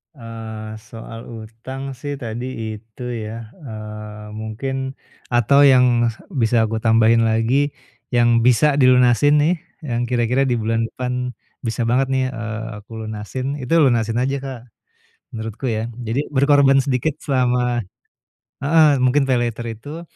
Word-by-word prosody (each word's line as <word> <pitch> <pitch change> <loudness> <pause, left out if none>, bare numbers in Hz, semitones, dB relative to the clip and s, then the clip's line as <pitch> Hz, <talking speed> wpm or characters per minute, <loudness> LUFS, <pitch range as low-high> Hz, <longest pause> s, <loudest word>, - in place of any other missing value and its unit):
Eee, 110 -3 -8
soal 115 +1 -10
utang 115 +4 -7
sih 140 +2 -5
tadi 120 -2 -5 0.3
itu 110 +2 -13
ya, 110 0 -6
eee, 105 -5 -8
mungkin 130 +5 -4 0.3
atau 120 +4 +4
yang 125 -3 +5 0.2
bisa 115 - +2
aku 110 0 -1
tambahin 115 0 +4
lagi, 125 +6 +1 0.4
yang 120 -1 +4
bisa 125 +5 +4
dilunasin 130 +2 +5
nih 165 +5 +3 0.3
yang 120 -4 -2
kira-kira 125 +1 +1
di 125 - +1
bulan 115 0 0
depan 125 -1 -4 0.3
bisa 115 0 -2
banget 130 +3 +2
nih, 130 -1 +1
eee, 115 -1 -5
aku 105 - -25
lunasin, 130 +7 -4
itu 130 +5 -3
lunasin 120 -6 +3
aja 135 +1 0
Kak 135 -2 -6 0.8
menurutku 110 +3 -5
ya. 115 0 -2 0.2
Jadi 130 +7 0
berkorban 140 0 +5
sedikit 135 +3 -1
selama 125 -3 +1 0.8
heeh 155 +2 +5 0.2
mungkin 135 +3 +4
paylater 120 -2 0
itu 145 +9 -8
120 Hz, 130 wpm, -20 LUFS, 115-135 Hz, 0.8 s, yang